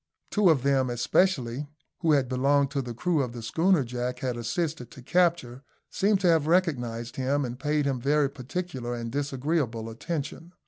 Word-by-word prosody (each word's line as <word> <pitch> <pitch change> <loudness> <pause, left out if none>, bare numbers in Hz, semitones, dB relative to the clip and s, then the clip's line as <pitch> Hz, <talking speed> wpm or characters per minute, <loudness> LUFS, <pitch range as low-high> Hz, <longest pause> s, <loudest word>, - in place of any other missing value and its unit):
Two 205 -4 +4
of 145 -6 +3
them 135 -2 +2
especially, 130 +1 +1 0.3
who 165 -3 +3
had 140 -3 +3
belonged 140 +2 +2
to 140 -1 -1
the 120 -2 -6
crew 165 +4 +1
of 125 -3 -3
the 120 -2 -7
schooner 165 +6 +2
Jack 125 +1 -3
had 125 -1 -2
assisted 125 +2 -3
to 125 +1 -13
capture, 170 -6 +1 0.3
seemed 200 0 +2
to 180 - +3
have 160 -3 +3
recognised 120 -10 0
him, 135 +2 0
and 125 +1 -6
paid 150 +1 0
him 135 -3 -1
very 145 +2 +3
particular 135 -2 -5
and 115 -1 -5
disagreeable 135 -4 -1
attention. 165 +6 -5
140 Hz, 175 wpm, -27 LUFS, 125-160 Hz, 0.3 s, Two